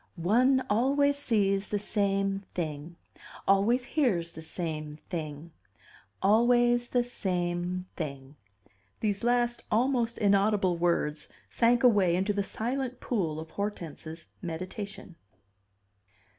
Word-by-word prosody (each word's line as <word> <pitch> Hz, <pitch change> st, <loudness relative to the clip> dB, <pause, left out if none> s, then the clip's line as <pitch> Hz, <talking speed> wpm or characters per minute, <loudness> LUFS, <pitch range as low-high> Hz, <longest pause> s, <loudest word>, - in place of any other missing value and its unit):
"One 250 Hz, +9 st, +3 dB
always 280 Hz, +6 st, +3 dB
sees 205 Hz, -7 st, +1 dB
the 205 Hz, -, 0 dB
same 195 Hz, -1 st, 0 dB
thing. 160 Hz, -1 st, -4 dB, 0.5 s
Always 205 Hz, +6 st, +3 dB
hears 205 Hz, -, 0 dB
the 160 Hz, -, -9 dB
same 155 Hz, -2 st, -5 dB
thing. 155 Hz, -1 st, -5 dB, 0.7 s
Always 240 Hz, +3 st, +4 dB
the 245 Hz, -1 st, +2 dB
same 180 Hz, -5 st, -2 dB
thing." 140 Hz, -3 st, -6 dB, 0.7 s
These 205 Hz, 0 st, -1 dB
last 240 Hz, 0 st, +1 dB
almost 235 Hz, 0 st, +1 dB
inaudible 200 Hz, -2 st, +3 dB
words 170 Hz, -3 st, 0 dB, 0.2 s
sank 240 Hz, +1 st, +3 dB
away 200 Hz, -8 st, +5 dB
into 195 Hz, +3 st, +1 dB
the 200 Hz, -, 0 dB
silent 250 Hz, +5 st, -3 dB
pool 170 Hz, -10 st, -1 dB
of 160 Hz, 0 st, -9 dB
Hortense's 165 Hz, -5 st, -5 dB, 0.2 s
meditation. 185 Hz, +1 st, -6 dB
195 Hz, 105 wpm, -29 LUFS, 170-240 Hz, 0.7 s, away